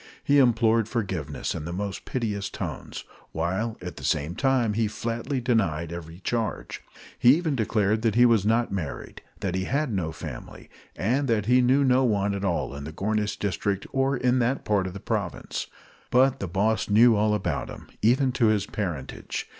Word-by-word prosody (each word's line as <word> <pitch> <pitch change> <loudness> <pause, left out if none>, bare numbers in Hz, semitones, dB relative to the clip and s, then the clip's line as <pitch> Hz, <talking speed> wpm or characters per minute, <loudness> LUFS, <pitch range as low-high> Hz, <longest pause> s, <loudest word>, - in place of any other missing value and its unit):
He 145 0 +4
implored 115 -3 +3
forgiveness 95 - -3
in 75 - -5
the 85 - -4
most 100 +2 -4
piteous 105 -6 -2
tones, - - -6 0.3
while 95 +8 -2
at 90 -3 -7
the - - -9
same 75 +2 0
time 130 -2 +1
he 110 +1 +1
flatly 115 +5 -3
denied 85 -10 0
every 85 -1 -8
charge. 115 +1 -3 0.4
He 125 +3 +7
even 160 -3 -1
declared 110 -1 +1
he 120 +1 +6
was 115 -5 +4
not 115 +3 +1
married, 85 -8 -5 0.2
that 95 -3 -1
he 95 0 -1
had 140 0 -1
no 85 -5 -1
family, - - -9 0.2
and 130 +8 0
that 110 -4 +1
he 125 +3 +4
knew 130 +3 +4
no 130 0 +4
one 100 -4 +1
at 100 0 -4
all 85 -7 -1
in 70 0 -7
the 80 - -6
Gornish 105 +3 -1
district 100 0 -2
or 135 0 +1
that 125 +1 +1
part 100 -3 +1
of 90 - -6
the 100 - -7
province. - - -3 0.4
But 130 +2 +3
the 95 - -3
boss 105 +6 0
knew 115 +3 +6
all 105 0 +2
about 105 - -2
him, - - -10
even 130 +4 +3
to 120 -2 +2
his 105 -2 +2
parentage. 85 -12 -4
110 Hz, 180 wpm, -26 LUFS, 95-125 Hz, 0.4 s, He